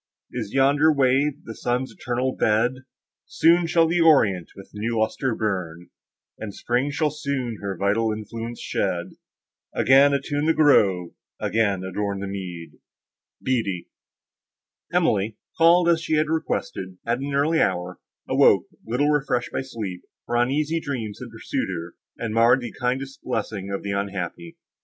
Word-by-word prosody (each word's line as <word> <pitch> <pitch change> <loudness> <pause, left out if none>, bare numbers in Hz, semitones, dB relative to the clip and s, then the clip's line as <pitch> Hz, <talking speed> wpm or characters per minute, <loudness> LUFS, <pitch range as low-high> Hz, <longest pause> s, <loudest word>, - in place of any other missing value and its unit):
Is 110 -5 -4
yonder 145 +3 +4
wave 140 +1 +2
the 115 - -7
sun's 125 +3 -2
eternal 125 +1 -2
bed?— 110 +3 +2 0.5
Soon 170 +1 +4
shall 165 0 +4
the 170 +1 +1
orient 105 - +4
with 95 - -13
new 115 +3 -2
lustre 110 +3 0
burn, 90 -5 -3 0.5
And 105 -2 -6
Spring 125 +4 0
shall 150 +1 0
soon 140 -6 -3
her 100 -2 -4
vital 105 +4 +1
influence 115 +2 -6
shed, - - -2 0.6
Again 135 +2 +6
attune 145 +2 -1
the 160 - +3
grove, 95 - +4 0.3
again 100 -4 0
adorn 100 +1 -3
the 100 - -4
mead! 90 -4 -7 0.6
BEATTIE 105 -9 -1 1.0
Emily, 105 +2 +1 0.2
called, 170 +1 +5
as 170 -1 +3
she 160 -1 0
had 155 0 +1
requested, 95 - -3
at 120 +1 0
an 140 +1 -3
early 155 +4 +2
hour, 90 0 -1 0.3
awoke, - - +4 0.2
little 125 +6 0
refreshed 135 -4 0
by - - -2
sleep, 110 -9 -6 0.2
for 120 - -3
uneasy 145 +7 +1
dreams 120 -9 -5
had 125 - -8
pursued 110 -3 -3
her, 85 -1 -6 0.2
and 115 -2 -3
marred 115 +3 +5
the 120 -2 -5
kindest 135 +2 -2
blessing 105 -5 -3
of 100 - -3
the 100 - -3
unhappy. 100 - -4
120 Hz, 145 wpm, -24 LUFS, 100-145 Hz, 1.0 s, Again